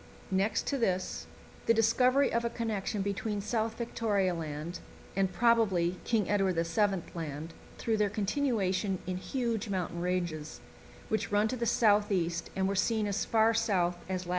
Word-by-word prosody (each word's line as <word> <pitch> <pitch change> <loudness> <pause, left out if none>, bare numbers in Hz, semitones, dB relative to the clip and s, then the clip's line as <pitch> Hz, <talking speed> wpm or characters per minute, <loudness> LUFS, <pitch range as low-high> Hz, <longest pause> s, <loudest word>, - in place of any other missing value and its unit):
Next 195 +3 +1
to 280 - -1
this, 185 -5 -1 0.4
the 230 - +5
discovery 250 +5 +3
of 235 0 +1
a 235 - 0
connection 215 -3 -2
between 205 +1 -2
South 220 +2 -1
Victoria 210 -5 0
Land 160 +1 -5 0.4
and, 190 -1 +1
probably, 190 -5 +2
King 220 -5 +1
Edward 195 -2 +2
VII. 175 +3 +1
Land 160 -1 -5 0.2
through 225 -1 0
their 210 -1 +2
continuation 205 -3 0
in 185 0 -2
huge 230 0 -2
mountain 180 -3 -2
ranges, 175 -4 -2 0.5
which 220 -1 -1
run 205 +1 +3
to 255 - -1
the 235 -1 -2
south 210 -2 +3
east 170 -3 -1
and 190 0 +1
were 195 - 0
seen 215 +3 +1
as 205 0 -1
far 225 0 +3
south 195 -6 +1
as 185 -1 -2
lat. - - -9
200 Hz, 165 wpm, -31 LUFS, 180-225 Hz, 0.5 s, the